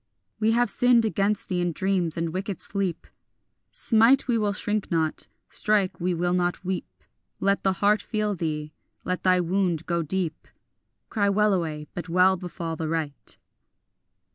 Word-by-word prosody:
We 220 +1 +3
have 235 -2 +3
sinned 245 -2 +4
against 205 -1 0
thee 180 -2 -1
in 175 -1 0
dreams 185 -3 0
and 165 -1 -2
wicked 190 -1 -3
sleep; 195 -4 -2 0.7
Smite, 230 +4 +4
we 240 - +2
will 210 -2 +1
shrink 210 0 -2
not; 160 -2 0 0.2
strike, 205 -3 +1
we 180 +1 +1
will 175 +1 0
not 180 0 -1
weep; 185 0 -5 0.4
Let 200 0 +1
the 190 - +2
heart 205 +3 +2
feel 215 -1 -1
thee; 155 -4 -3 0.3
let 180 0 -2
thy 185 -1 +4
wound 175 -2 0
go 170 -1 0
deep; 165 0 -3 0.6
Cry 205 -3 +1
wellaway, 185 -7 +1
but 175 -1 -6
well 185 +2 +4
befall 175 -2 -5
the 160 0 -3
right. 155 -4 -3
185 Hz, 155 wpm, -25 LUFS, 170-205 Hz, 0.7 s, sinned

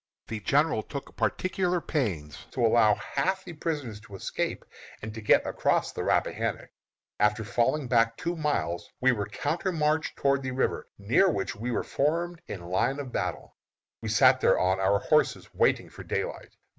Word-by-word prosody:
The 110 - -3
general 145 +3 +2
took 140 +5 -8
particular 185 -1 0
pains 90 - -3
to 125 -3 +1
allow 110 -2 +5
half 190 0 -1
the 175 - -7
prisoners 145 -9 -4
to 105 -3 -12
escape 95 - -3 0.3
and 110 0 -7
to 110 - -7
get 105 - +4
across - - +1
the - - -4
Rappahannock. - - -1 0.5
After 105 +1 +2
falling 125 +6 0
back 115 -2 +3
two 170 +1 -2
miles, 150 - -1
we 130 +1 +4
were 105 -5 -2
countermarched 155 - -1
toward 140 -1 +2
the 130 -1 -4
river, 130 - -1
near 115 - +3
which 100 - -2
we 115 +4 -4
were 120 - 0
formed 170 +4 -1
in 90 -4 -6
line 95 +10 0
of 135 -3 -6
battle. - - -3 0.5
We - - -4
sat - - +5
there - - +4
on 95 +1 +2
our 95 +1 +3
horses - - +1
waiting - - +2
for - - -10
daylight. - - -4
125 Hz, 170 wpm, -28 LUFS, 105-155 Hz, 0.5 s, allow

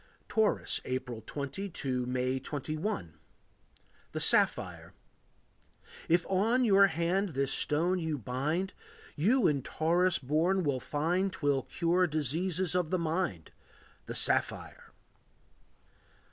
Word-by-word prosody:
Taurus. 220 -2 0
April 125 -3 -4
20 145 - -5
to 130 -7 -3
May 130 +1 -1
21. 150 - -4 0.9
The - - -2
Sapphire. - - +2 1.2
If 170 +2 +3
on 220 +7 +2
your 200 -2 +6
hand 185 +4 0
this 135 -1 +1
stone 170 +5 +1
you 160 -3 -2
bind, 140 - -2 0.4
You 220 - +2
in 140 -3 +2
Taurus 175 +6 +1
born 165 +8 +1
will 140 -4 0
find 175 +9 -1
'Twill 145 -5 0
cure 175 +5 +1
diseases 165 +4 0
of 180 -3 0
the 185 - +1
mind, 160 - -2 0.6
The - - -5
sapphire. - - 0
160 Hz, 110 wpm, -30 LUFS, 135-185 Hz, 1.2 s, your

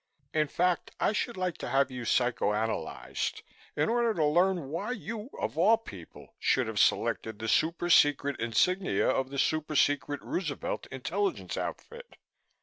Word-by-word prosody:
In 155 -1 +2
fact, 180 +3 0
I - - +2
should 235 0 -2
like 185 -2 -2
to - - -5
have 135 +1 +2
you 125 -2 -6
psycho 120 -3 +1
analyzed, 110 +1 -3 0.3
in - - +1
order 235 -1 +1
to 155 - +2
learn 175 -1 +2
why 170 - -3
you, 225 +1 -6
of 160 - -3
all 215 +6 +6
people, 95 - -12
should - - +2
have - - -3
selected 110 -2 +1
the 110 - -5
super 165 +8 +1
secret 145 -4 +4
insignia 180 - +1
of 130 0 +1
the 140 - -6
super 155 +2 0
secret 145 +1 +2
Roosevelt 160 -6 -3
intelligence 150 - -2
outfit. - - -6
155 Hz, 155 wpm, -29 LUFS, 130-185 Hz, 0.3 s, all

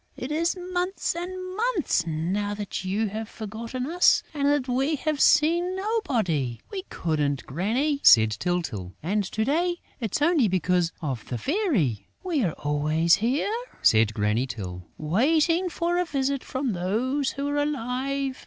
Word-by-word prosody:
It 255 - -5
is 335 +4 0
months 360 +1 -2
and 350 +1 -4 0.3
months 415 - 0
now 185 +6 -1
that 205 -2 -5
you 200 +3 -1
have 220 +2 -5
forgotten 230 +4 -5
us 350 +5 +4
and 285 -2 0
that 285 -2 +2
we 265 +5 +1
have 300 0 -1
seen 345 +4 +4
nobody...." 235 - -1
"We 390 -2 -5
couldn't, 150 -4 -1
Granny," 235 - 0
said 110 -1 +7
Tyltyl, 115 - -3
"and 205 +5 0
to 220 +3 -2
day 345 +6 +1 0.2
it's 225 0 -2
only 305 -7 +4
because 180 -2 +1
of 130 -7 -3
the 125 - -2
Fairy...." 215 - 0 0.2
"We 335 -8 0
are 170 -6 0
always 155 +3 +2
here," 260 - 0 0.3
said 110 -1 +4
Granny 105 +4 +1
Tyl, 90 -7 -7
"waiting 315 - +2
for 345 +1 0
a 360 - +1
visit 275 -3 -1
from 260 -3 -2
those 240 +10 0
who 280 +1 -3
are 290 - -1
alive. 275 -1 -2
245 Hz, 155 wpm, -26 LUFS, -, 0.3 s, said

